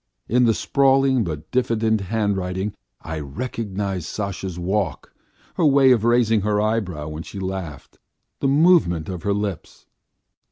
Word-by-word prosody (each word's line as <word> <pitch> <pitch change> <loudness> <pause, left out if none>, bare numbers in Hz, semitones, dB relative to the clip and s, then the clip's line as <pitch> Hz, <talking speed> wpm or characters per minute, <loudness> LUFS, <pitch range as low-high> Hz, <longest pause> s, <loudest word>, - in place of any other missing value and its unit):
In 125 +2 +3
the 115 -2 +3
sprawling 135 -2 +3
but 80 -3 -6
diffident 115 -4 +1
handwriting 100 -1 -2 0.3
I 80 -1 -5
recognised 100 - -4
Sasha's 95 -3 -4
walk, 95 +3 -2 0.4
her 170 - +2
way 135 -2 +5
of 115 -4 +3
raising 115 -2 +3
her 105 +1 +1
eyebrows 95 -9 -1
when 75 +1 -6
she 100 - -8
laughed, 95 -7 -6 0.4
the 135 - 0
movement 140 - +3
of 90 -2 -5
her 100 - 0
lips. 100 -5 -5
105 Hz, 135 wpm, -22 LUFS, 90-120 Hz, 0.4 s, way